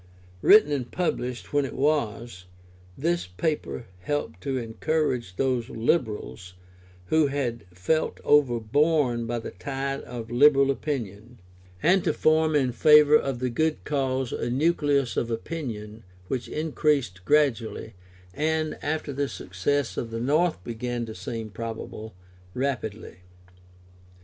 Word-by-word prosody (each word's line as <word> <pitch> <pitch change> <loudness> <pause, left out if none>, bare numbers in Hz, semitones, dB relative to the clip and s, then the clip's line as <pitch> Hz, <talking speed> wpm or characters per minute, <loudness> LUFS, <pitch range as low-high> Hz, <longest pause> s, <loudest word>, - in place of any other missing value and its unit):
] 90 0 -25
Written 210 -8 +8
and 130 -4 -2
published 125 -9 -3
when 145 0 +3
it 135 - -5
was, 120 -9 -1 0.5
this 170 - 0
paper 90 - -3
helped 90 - -3
to 135 +3 -2
encourage 125 - -1
those 125 -2 0
Liberals 110 - -2 0.5
who 160 -2 +4
had 130 -4 -3
felt 95 - -1
overborne 130 -1 +2
by 120 +1 -2
the 115 - -6
tide 135 +7 -4
of 115 -2 -8
illiberal 140 +2 +5
opinion, 120 -5 -5 0.4
and 180 +2 +4
to 155 - +1
form 155 0 +3
in 130 -4 +2
favour 150 +4 +6
of 135 -4 +1
the 125 0 -2
good 155 +5 0
cause 135 -3 -1
a - - -2
nucleus 140 -1 +1
of 120 - 0
opinion 115 -4 -5 0.3
which 125 -2 -2
increased 145 - 0
gradually, 120 -5 +1 0.4
and, 155 +2 -1
after 150 -1 -2
the 140 +1 -1
success 115 +9 -2
of 115 - -3
the 115 0 -4
North 150 - +1
began 120 +1 -3
to 110 - -7
seem 110 +3 -6
probable, 110 -1 -7 0.4
rapidly. 120 -7 -3
130 Hz, 130 wpm, -26 LUFS, 115-150 Hz, 0.5 s, Written